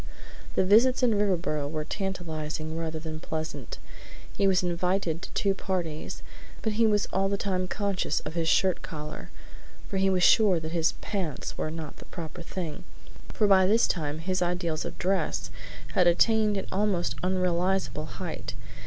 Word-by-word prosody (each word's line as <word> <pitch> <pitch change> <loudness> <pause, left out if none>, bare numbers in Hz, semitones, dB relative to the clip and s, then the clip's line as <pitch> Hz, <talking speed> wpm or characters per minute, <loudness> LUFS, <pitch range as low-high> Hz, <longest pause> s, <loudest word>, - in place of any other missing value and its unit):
The - - +3
visits 245 +7 +5
in 245 - +5
Riverboro 180 -8 +1
were 155 0 -3
tantalizing 160 -6 -4
rather 160 -1 -3
than 155 0 -5
pleasant. 160 - -5 0.6
He 195 - +3
was 190 0 +3
invited 180 -1 0
to - - -8
two 200 -1 +2
parties, 175 -5 -3 0.4
but 220 - 0
he 225 +1 +4
was 210 -1 +2
all 195 +1 +2
the 200 - 0
time 185 -2 -1
conscious 200 -6 0
of 150 - -6
his 165 -1 0
shirt 185 +2 +3
collar, 150 -1 -7 0.6
and 195 - 0
he 195 - +4
was 185 -1 +2
sure 200 -5 +6
that 160 0 -5
his 165 -1 +2
"pants" 185 -8 -3
were - - -2
not 160 -2 -6
the - - -12
proper 170 0 -7
thing, 175 0 -5 0.4
for 215 - 0
by 190 -2 +6
this 225 +4 +4
time 150 -4 -1
his 185 +3 -1
ideals 175 -3 -1
of - - -6
dress 185 -3 0 0.4
had 180 - +4
attained 210 +4 +4
an 195 - -3
almost 190 -3 +1
unrealizable 185 -3 0
height. 120 - -5
180 Hz, 165 wpm, -28 LUFS, 160-195 Hz, 0.6 s, sure